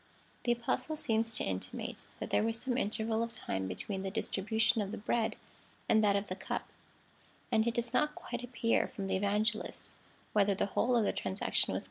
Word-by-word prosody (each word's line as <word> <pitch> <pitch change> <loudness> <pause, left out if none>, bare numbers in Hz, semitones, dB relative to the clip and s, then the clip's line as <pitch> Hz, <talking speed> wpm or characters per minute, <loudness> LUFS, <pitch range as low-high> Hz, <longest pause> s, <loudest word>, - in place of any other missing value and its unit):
The 240 - +4
Apostle 240 +6 0
seems 225 -6 +2
to - - +1
intimate, 95 -1 -4
that - - -5
there - - +4
was 225 +1 0
some 255 +1 -1
intei'val 220 -1 0
of 230 0 -3
time 95 0 -2
between 190 - -3
the 195 - -2
distribution 220 +3 +1
of 200 - -2
the 220 - -4
bread 220 +2 0 0.5
and 220 0 +5
that 200 -1 +4
of 200 +1 +1
the 185 - -4
cup, 190 - -3 0.8
and 220 +1 +3
it 235 - 0
does 235 0 0
not 300 +3 +2
quite 240 0 -5
appear 230 -2 +1
from 220 -7 -5
the 195 - 0
Evangelists 210 +3 0 0.4
whether 200 -1 +4
the - - +1
whole 250 +1 +3
of 230 - +4
the - - +1
transaction 95 -1 0
was - - -2
continuous. - - 0
220 Hz, 200 wpm, -33 LUFS, 200-235 Hz, 0.8 s, and